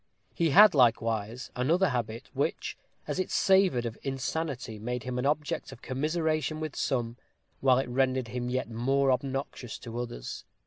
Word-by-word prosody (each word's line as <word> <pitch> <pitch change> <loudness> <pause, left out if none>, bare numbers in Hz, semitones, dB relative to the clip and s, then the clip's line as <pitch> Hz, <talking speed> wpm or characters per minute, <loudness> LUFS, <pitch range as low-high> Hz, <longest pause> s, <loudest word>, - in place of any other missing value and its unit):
He 165 -1 +1
had 200 +5 +8
likewise 115 -2 +1
another 165 +9 +2
habit, 115 -3 -3
which, - - -1 0.3
as - - -2
it 185 - -1
savored 190 -11 +3
of 115 -1 -5
insanity, 135 -3 -3
made 125 +3 -3
him 125 -1 -3
an 130 - +1
object 150 +1 -1
of - - -13
commiseration 155 +3 -1
with 155 -2 -4
some, 120 -3 -1 0.4
while 130 -2 +4
it 135 - 0
rendered 130 -1 +1
him 125 0 -3
yet 130 -1 -1
more 135 +4 +1
obnoxious 135 -2 -3
to 115 0 -7
others. - - -6
130 Hz, 160 wpm, -29 LUFS, 120-150 Hz, 0.4 s, had